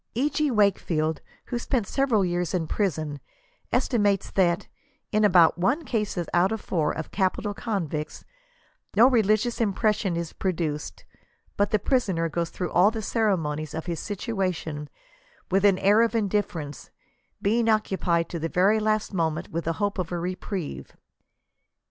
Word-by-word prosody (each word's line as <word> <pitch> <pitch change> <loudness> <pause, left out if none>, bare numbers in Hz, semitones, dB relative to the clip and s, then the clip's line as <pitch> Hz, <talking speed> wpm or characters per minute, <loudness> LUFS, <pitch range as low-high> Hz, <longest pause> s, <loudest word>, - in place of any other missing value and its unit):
E. 280 +5 +1
G. 300 +1 +1
Wakefield, 170 - +1 0.3
who 240 - -1
spent 240 -2 -1
several 235 -5 +1
years 175 -1 -1
in 170 -3 0
prison, 155 -5 -2 0.5
estimates 205 -5 +1
that 175 -2 +1 0.2
" - - -43
in 215 0 +2
about 175 -4 +5
one 270 - +1
case 210 -6 -2 0.2
out 180 +3 +3
of 220 - -2
four" 160 -7 0
of 160 - -6
capital 200 +1 0
convicts 170 -9 -4 0.7
'*no 230 +4 +7
re 250 -4 +4
ligious 215 +4 +1
impression 210 -3 +1
is 170 -1 -4
produced, 160 -5 -3 0.5
but 205 0 +1
the 215 - +3
prisoner 195 -7 0
goes 170 +2 -2
through 180 - -4
all 185 +4 +5
the 220 -1 -5
ceremonies 160 -10 -1
of 160 - -4
his 170 -3 -3
situation 185 -8 -3 0.6
with 195 +1 +3
an 200 -2 +5
air 205 +4 +4
of 230 0 +1
indifference, 190 - -2 0.5
being 225 +3 +1
occupied 190 -6 +1
to 170 - -5
the 165 +1 -2
very 195 +6 +3
last 215 -1 0
moment 160 -4 -1
with 165 +1 -3
the 165 - 0
hope 205 +2 -2
of 180 -2 -3
a 175 - -1
re 180 +2 -2
prieve." 185 -6 -6
190 Hz, 160 wpm, -26 LUFS, 165-215 Hz, 0.7 s, no